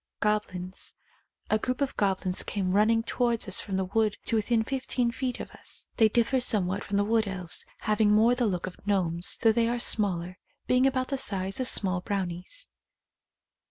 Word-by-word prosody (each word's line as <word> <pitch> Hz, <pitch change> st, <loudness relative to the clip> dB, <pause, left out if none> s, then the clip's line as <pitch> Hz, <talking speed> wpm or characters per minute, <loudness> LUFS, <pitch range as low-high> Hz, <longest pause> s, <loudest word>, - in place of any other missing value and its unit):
Goblins. 190 Hz, -3 st, -2 dB, 0.6 s
A 215 Hz, -, +3 dB
group 255 Hz, +3 st, -2 dB
of 280 Hz, -2 st, -1 dB
goblins 190 Hz, -2 st, 0 dB
came 190 Hz, -3 st, -2 dB
run 210 Hz, +3 st, +4 dB
ning 225 Hz, 0 st, +2 dB
towards 235 Hz, -1 st, 0 dB
us 190 Hz, -, +5 dB
from 195 Hz, -2 st, -3 dB
the 190 Hz, -, 0 dB
wood 210 Hz, +2 st, 0 dB
to -, -, +1 dB
within 225 Hz, +1 st, +1 dB
fif 265 Hz, +2 st, -4 dB
teen 240 Hz, -2 st, +1 dB
feet 250 Hz, +1 st, -3 dB
of -, -, -7 dB
us. -, -, -4 dB
They 220 Hz, -1 st, +5 dB
differ 240 Hz, +4 st, +2 dB
somewhat 200 Hz, -5 st, +1 dB
from 200 Hz, -, -2 dB
the 205 Hz, -, +3 dB
wood 220 Hz, 0 st, +1 dB
elves, 185 Hz, -3 st, -5 dB
having 215 Hz, -1 st, +2 dB
more 220 Hz, +3 st, +5 dB
the 245 Hz, -2 st, +1 dB
look 180 Hz, -3 st, -2 dB
of 185 Hz, -, -8 dB
gnomes, 175 Hz, -4 st, 0 dB
though 225 Hz, -, +6 dB
they 230 Hz, +1 st, +1 dB
are 240 Hz, +1 st, 0 dB
smaller, 185 Hz, -6 st, +1 dB, 0.3 s
being 255 Hz, +1 st, +3 dB
about 255 Hz, -1 st, -1 dB
the 275 Hz, -2 st, -1 dB
size 195 Hz, -4 st, -1 dB
of 255 Hz, -, 0 dB
small 185 Hz, -3 st, +2 dB
brownies. 185 Hz, -, -4 dB
210 Hz, 195 wpm, -27 LUFS, 190-235 Hz, 0.6 s, though